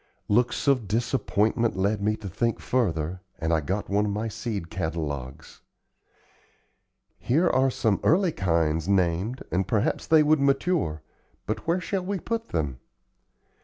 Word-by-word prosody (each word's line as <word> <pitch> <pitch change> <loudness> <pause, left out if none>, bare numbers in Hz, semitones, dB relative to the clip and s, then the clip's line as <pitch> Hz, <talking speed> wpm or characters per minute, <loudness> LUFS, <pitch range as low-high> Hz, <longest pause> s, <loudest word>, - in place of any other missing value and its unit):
Looks 120 +5 +1
of 130 -7 +3
disappointment 115 0 +1
led 100 +2 +1
me 105 +1 +1
to 105 - -8
think 115 +5 -1
further 90 -8 -1 0.2
and 80 +1 -1
I 80 - +2
got 95 +8 -2
one 105 +1 +1
of - - -1
my 110 +3 -2
seed 100 -6 -5
catalogues. 75 -7 -5 1.6
"Here 160 +9 +2
are 135 -3 +3
some 110 -5 +1
early 180 +1 +3
kinds 80 - 0
named 95 +5 +1
and 95 +1 0
perhaps 105 -3 0
they 160 -1 +6
would 155 0 +3
mature; 140 - +1 0.4
but - - -4
where 170 +2 +2
shall 190 0 -2
we 195 +2 -2
put 230 +4 -3
them?" 70 -6 -2
105 Hz, 145 wpm, -26 LUFS, 85-130 Hz, 1.6 s, they